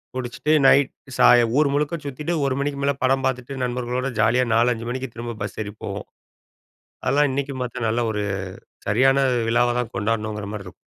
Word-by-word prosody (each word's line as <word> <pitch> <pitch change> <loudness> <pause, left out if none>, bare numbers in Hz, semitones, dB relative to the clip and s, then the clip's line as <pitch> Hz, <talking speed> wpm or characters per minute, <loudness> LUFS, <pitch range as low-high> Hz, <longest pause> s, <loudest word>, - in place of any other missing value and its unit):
குடிச்சுட்டு 130 +4 -1
நைட் 140 -1 +5 0.3
சாய 120 -1 +7
ஊர் 140 -2 +3
முழுக்க 150 +3 0
சுத்தீட்டு, 150 +5 -3
1 130 - 0
மணிக்கு 140 -1 -2
மேலே 140 -1 +1
படம் 135 +1 +2
பார்த்துட்டு 130 +1 -4
நண்பர்களோட 125 +1 -2
ஜாலியா, 125 +3 +3
4 120 +2 +4
5 115 +1 -7
மணிக்கு 130 0 -4
திரும்ப 120 -1 -5
பஸ் 100 - -6
ஏறி 105 0 -8
போவோம். - - -5 1.0
அதெல்லாம் 145 0 +3
இன்னைக்கும் 140 -1 -3
பார்த்தா, 120 -1 -4
நல்ல 115 +2 0
ஒரு 105 -1 -2 0.7
சரியான 130 +6 +4 0.3
விழாவா 120 +1 +2
தான் 120 -1 -5
கொண்டாடணுங்கிற 105 -1 -2
மாரி 105 - -4
இருக்கும். - - -12
125 Hz, 170 wpm, -23 LUFS, 115-135 Hz, 1.0 s, சாய